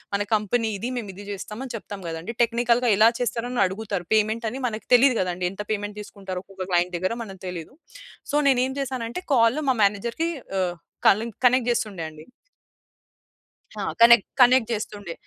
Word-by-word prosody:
మన 205 - 0
కంపెనీ 220 +2 0
ఇది. 235 +6 -4
మేము 215 -5 -5
ఇది 200 +2 -11
జేస్తాం 210 +4 -7
అని 250 - -7
చెప్తాం 205 -2 -7
గదండీ! 165 +7 -5
టెక్నికల్‌గా 235 +1 +2
ఎలా 220 +2 +7
చేస్తారని 245 +1 -1
అడుగుతరు. 195 -2 -4
పేమెంట్ 220 +2 +1
అని 265 - -6
మనకు 215 -2 -6
తెలీదు 250 -1 +5
గదండీ! 180 0 -1
ఎంత 200 - -6
పేమెంట్ 205 0 -3
తీసుకుంటారో 190 -3 -7
ఒక్కొక్క 190 -1 -7
క్లయింట్ 175 0 +1
దగ్గర 185 +6 -1
మనకు 195 -3 -11
తెలీదు. 180 - -7 0.6
సో, - - -1
నేనేం 260 0 +2
చేసానంటే, 255 +3 -4
కాల్‌ 230 +5 +3
మా 260 - +3
మేనేజర్‌కి 230 +11 0 0.3
ఆహ్, 175 -1 -1 0.3
కలె 215 +4 +4 0.2
కనెక్ట్ 250 -1 +2
జేస్తుండే 215 -8 -2
అండి. 155 0 -13 1.6
ఆ! - - -2 0.2
కనెక్ 235 -3 +8 0.2
కనెక్ట్ 250 -1 +5
జేస్తుండే. 205 -4 -4
215 Hz, 160 wpm, -24 LUFS, 195-240 Hz, 1.6 s, కనెక్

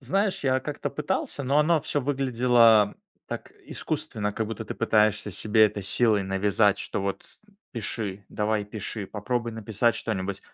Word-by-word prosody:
Знаешь, 195 - -1
я 130 -1 +2
как-то 145 +2 -4
пытался, 145 0 -2
но 140 +2 +2
оно 155 +1 +3
всё 145 -1 -1
выглядело 120 -5 +4 0.3
так - - -6 0.2
искусственно, 105 -1 -3
как 110 +1 -2
будто 115 +1 -5
ты - - -6
пытаешься 110 -2 +2
себе 110 +3 +3
это 105 -1 -5
силой 105 +1 +3
навязать, 100 +2 +2
что - - -3
вот, 100 0 -3 0.2
м, 200 - -25 0.2
пиши, 105 -3 -4
давай, 105 0 -1
пиши, 105 0 -5
попробуй 115 +4 -3
написать 110 +1 0
что-нибудь. 100 -3 -3
110 Hz, 155 wpm, -26 LUFS, 105-125 Hz, 0.3 s, выглядело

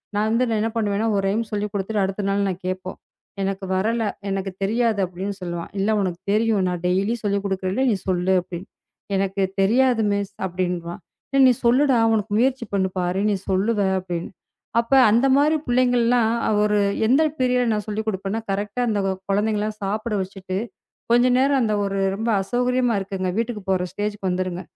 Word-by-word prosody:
நான் 210 +1 +1
வந்து 240 +2 +2
நான் 220 - 0
என்ன 225 - 0
பண்ணுவேன்னா, 210 -1 0
ஒரு 195 - 0
ரைம்ஸ் 220 +2 -2
சொல்லிக் 210 0 -2
கொடுத்துட்டு 200 +1 -1
அடுத்த 195 +1 -2
நாள் 200 0 +1
நான் 185 -1 -4
கேட்போம். 185 0 -4 0.4
"எனக்கு 195 0 -2
வரல, 225 +5 0 0.3
எனக்குத் 195 -1 -4
தெரியாது" 225 +1 +1
அப்படின்னு 190 +3 -5
சொல்லுவான். 175 -1 -5
"இல்ல 200 - +1
உனக்குத் 185 0 -4
தெரியும். 215 -2 +2
நான் 180 -1 -2
டெய்லி 195 +5 +1
சொல்லிக் 200 -1 0
கொடுக்கறேன்ல. 190 +5 -1
நீ - - +2
சொல்லு" 185 0 +1
அப்படின்னு. 175 +1 -8 0.5
"எனக்குத் 195 0 -1
தெரியாது 240 +3 +3
மிஸ்." 200 0 -3
அப்படின்றுவான். 175 -1 -3 0.3
"இல்ல 275 -1 +3
நீ 255 - +6
சொல்லுடா. 260 +2 +4 0.2
உனக்கு 215 -1 -1
முயற்சி 255 -2 +1
பண்ணு, 190 -1 +1
பாரு. 180 +2 0
நீ - - +1
சொல்லுவே" 200 +1 +1
அப்படின்னு. 175 -2 -5 0.5
அப்ப 235 +3 -1 0.2
அந்த 240 +5 +4
மாரி 300 +2 +3
புள்ளைங்கல்லாம் 245 -2 +3 0.3
ஒரு 210 0 +2 0.3
எந்த 265 +6 +4 0.2
பீரியட்ல 250 -2 +2
நான் 210 -1 -2
சொல்லிக் 215 +1 -3
கொடுப்பேன்னா, 195 +2 -3
கரெக்ட்டா 205 +5 -2
அந்த 210 -2 0
க 190 - +1 0.2
குழந்தைங்க 210 +1 +1
எல்லாம் 215 0 -4
சாப்பிட 215 +3 -2
வச்சிட்டு, 185 0 -6 0.5
கொஞ்ச 240 +1 +5
நேரம் 275 +1 +3
அந்த 215 -2 +1
ஒரு 195 0 -2 0.2
ரொம்ப 225 +3 -2
அசௌகரியமா 245 +2 +1
இருக்குங்க. 190 -1 -3
வீட்டுக்குப் 220 -4 -3
போற 185 -1 +1
ஸ்டேஜ்க்கு 205 -1 -3
வந்துருங்க. 180 0 -2
205 Hz, 170 wpm, -22 LUFS, 190-230 Hz, 0.5 s, நீ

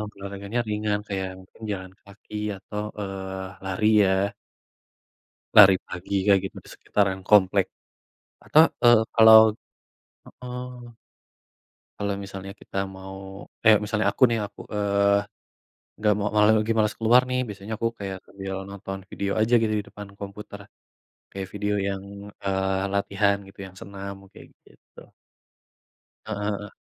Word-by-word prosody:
olahraganya 100 +3 -5
ringan 105 -1 -1
kayak 95 -1 -2
mungkin 95 +4 -19
jalan 95 -1 -6
kaki 100 +1 -13 0.2
atau, 105 +2 -6 0.2
eee, 95 -1 -5 0.2
lari 95 +3 0 0.2
ya. 95 +2 +1 1.2
Lari 100 -2 +10
pagi 90 +2 -6
kayak 100 -2 +5
gitu 95 - -6
di - - -16
sekitaran 95 -2 0
komplek. 100 -2 +5 0.8
Atau, 155 - +7 0.2
eee, 120 -2 +7
kalau 110 -1 +9 0.9
heeh. 125 -1 -9 1.0
Kalo 100 0 -2
misalnya 95 0 -8
kita - - -11 0.2
mau, 95 +1 -9 0.2
eh 110 -1 +9
misalnya 105 0 -1
aku - - -9
nih 115 - +1
aku, 100 - -17
eee, 100 0 +2 0.8
nggak 105 -1 +3
mau 105 0 0
malah 105 +1 +6
lagi 110 +1 -1
males 105 -1 +2
keluar 120 +3 +6
nih 125 0 0
biasanya 105 +1 -7
aku 115 - 0
kaya 100 -1 -5
sambil 95 -1 -7 0.2
nonton 95 -1 -7
video 100 0 -3
aja 110 +3 +1
gitu 110 -1 +1
di - - -4
depan 105 -1 -10
komputer, 100 0 -8 0.7
kayak 95 -1 -5
video 105 0 -1
yang, 95 -1 -3 0.4
eee, 95 0 0
latihan 100 0 +1
gitu 100 0 -17
yang 95 - -13
senam 100 0 -8 0.2
kayak - - -14 0.2
gitu. - - -19 1.3
Heeh 110 -2 -4 0.2
heeh. 105 -1 -10
100 Hz, 135 wpm, -25 LUFS, 95-105 Hz, 1.3 s, Lari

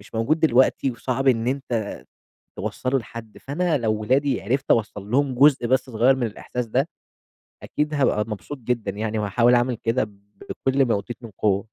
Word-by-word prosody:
مش 105 - -17
موجود 115 +8 +1
دلوقتي، 130 -2 +3
وصعب 130 +2 -1
إن 115 -2 +2
أنت 125 -6 -2 0.6
توصلّه 130 +1 -1
لحد، 115 -1 -9
فأنا 160 +2 -1
لو 110 -2 0
ولادي 130 +3 +1
عرفت 130 +7 -1
أوصّل 105 -2 0
لهم 135 +1 +2
جزء 135 -1 +5
بس 130 +2 +2
صغير 120 +4 +3
من 125 -2 0
الإحساس 120 +3 -5
ده، 130 +7 0 0.8
أكيد 150 +1 -2
هابقى 135 -7 +2
مبسوط 115 +7 -6
جدًا 115 -4 -2
يعني، 110 +2 -3
وهاحاول 115 +4 +3
أعمل 120 +1 +1
كده 115 +2 0
ب 100 -2 -11 0.5
بكل 135 +1 +4
ما 120 - +1
أوتيت 105 +3 -4
من 115 - -9
قوة. 100 -2 +2
120 Hz, 175 wpm, -23 LUFS, 110-135 Hz, 0.8 s, جزء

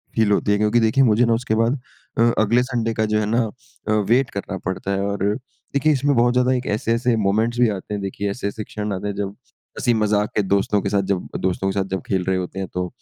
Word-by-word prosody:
Feel 110 -2 +3
होती 100 0 +2
है 105 - +3
क्योंकि 105 +3 +3
देखिए, 115 +4 +3
मुझे 115 0 +4
ना 115 - +2
उसके 115 -1 0
बाद 115 +5 +1 0.4
अ, - - +3 0.2
अगले 115 +3 +3
संडे 120 -3 -1
का 110 - 0
जो 105 - +3
है 105 - 0
ना 115 +3 +2 0.5
अ, - - +1 0.2
वेट 125 +1 +3
करना 100 -1 -5
पड़ता 95 +1 -2
है 100 0 0
और 100 0 -1 0.5
देखिए, 150 +2 +3
इसमें 140 0 +1
बहुत 120 +1 +3
ज़्यादा 125 +1 +3
एक 125 0 -2
ऐसे-ऐसे 115 +2 +1
मोमेंट्स 110 +3 +1
भी 120 - +5
आते 100 0 -5
हैं, 100 - -3
देखिए, 100 +1 -3
ऐसे-ऐसे 100 0 -4
क्षण 105 -1 -4
आते 95 +2 -4
हैं, 100 - -3
जब 100 -1 -2 0.5
हँसी-मज़ाक 105 -4 +1
के - - +3
दोस्तों 100 +1 +1
के 100 - -2
साथ 100 0 +2
जब 90 - -4
दोस्तों 95 +1 -1
के 100 - -1
साथ 95 - 0
जब 95 - -1
खेल 95 -2 0
रहे 95 0 +2
होते 90 +1 -4
हैं। 95 - -3
तो 90 0 -1
105 Hz, 245 wpm, -21 LUFS, 100-120 Hz, 0.5 s, भी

